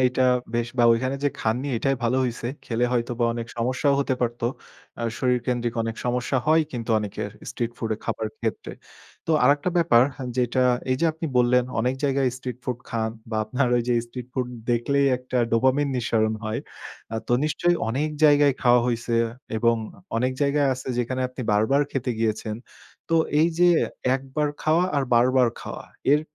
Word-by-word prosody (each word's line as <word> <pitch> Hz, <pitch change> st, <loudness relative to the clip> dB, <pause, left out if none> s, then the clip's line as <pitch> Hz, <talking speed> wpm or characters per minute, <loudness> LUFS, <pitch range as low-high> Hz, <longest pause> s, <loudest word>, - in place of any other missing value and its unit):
এটা 130 Hz, +1 st, +2 dB, 0.3 s
বেশ 120 Hz, 0 st, 0 dB
বা 120 Hz, -, +5 dB
ওইখানে 130 Hz, +4 st, 0 dB
যে -, -, +4 dB
খাননি 125 Hz, +6 st, -1 dB
এটাই 135 Hz, +3 st, 0 dB
ভালো 120 Hz, +3 st, +2 dB
হইছে। 120 Hz, -1 st, -3 dB, 0.2 s
খেলে 120 Hz, +1 st, 0 dB
হয়তোবা 120 Hz, 0 st, 0 dB
অনেক 115 Hz, -1 st, -4 dB
সমস্যাও 130 Hz, +4 st, +1 dB
হতে 135 Hz, -2 st, 0 dB
পারতো। 120 Hz, -1 st, -1 dB, 0.5 s
আ -, -, -3 dB, 0.2 s
শরীরকেন্দ্রিক 125 Hz, -1 st, 0 dB
অনেক 115 Hz, 0 st, -4 dB
সমস্যা 125 Hz, +2 st, 0 dB
হয় 160 Hz, +1 st, +5 dB
কিন্তু 120 Hz, -2 st, -4 dB
অনেকের 105 Hz, -1 st, -4 dB, 0.2 s
street 120 Hz, -1 st, -3 dB
food 115 Hz, -1 st, -3 dB
এ -, -, -21 dB
খাবার 110 Hz, -, -2 dB
ক্ষেত্রে। 110 Hz, -2 st, -3 dB, 0.5 s
তো -, -, -1 dB
আরেকটা 145 Hz, +5 st, +3 dB
ব্যাপার 125 Hz, -9 st, +5 dB, 0.3 s
যেটা 125 Hz, +1 st, +1 dB, 0.3 s
এই 130 Hz, -, +2 dB
যে 170 Hz, -, +3 dB
আপনি 160 Hz, +1 st, -5 dB
বললেন 125 Hz, 0 st, +4 dB, 0.2 s
অনেক 125 Hz, +2 st, +1 dB
জায়গায় 135 Hz, -1 st, +2 dB
street 125 Hz, -2 st, -6 dB
food 125 Hz, -2 st, -3 dB
খান 110 Hz, -1 st, -1 dB, 0.2 s
বা 110 Hz, -, -1 dB
আপনার 125 Hz, +4 st, 0 dB
ওইযে 120 Hz, 0 st, +1 dB
street 125 Hz, 0 st, -8 dB
food 125 Hz, -2 st, -2 dB, 0.2 s
দেখলেই 140 Hz, +4 st, +2 dB
একটা 125 Hz, 0 st, -3 dB
dopamine 130 Hz, +4 st, +2 dB
নিঃসারণ 110 Hz, -2 st, +1 dB
হয়। 110 Hz, +1 st, -2 dB, 0.5 s
আ -, -, 0 dB
তো -, -, +1 dB
নিশ্চয়ই 175 Hz, +3 st, +1 dB
অনেক 140 Hz, +6 st, 0 dB, 0.2 s
জায়গায় 145 Hz, -2 st, +5 dB
খাওয়া 120 Hz, -1 st, +5 dB
হইছে 120 Hz, -1 st, -1 dB
আ -, -, -8 dB, 0.3 s
এবং 115 Hz, +1 st, +3 dB, 0.4 s
অনেক 130 Hz, +2 st, +1 dB
জায়গায় 140 Hz, 0 st, +2 dB
আছে 130 Hz, +1 st, -8 dB
যেখানে 130 Hz, +2 st, -1 dB
আপনি 125 Hz, 0 st, -7 dB
বারবার 110 Hz, +7 st, +3 dB
খেতে 130 Hz, -1 st, -2 dB
গিয়েছেন। 110 Hz, -1 st, -1 dB, 0.5 s
তো 165 Hz, -, +1 dB, 0.3 s
এইযে 170 Hz, +2 st, +4 dB, 0.5 s
একবার 135 Hz, +3 st, -2 dB
খাওয়া 160 Hz, +3 st, +3 dB
আর 140 Hz, -, +2 dB
বারবার 125 Hz, +1 st, +4 dB
খাওয়া। -, -, -7 dB, 0.3 s
এর 150 Hz, -, +5 dB
125 Hz, 170 wpm, -24 LUFS, 115-140 Hz, 0.5 s, বা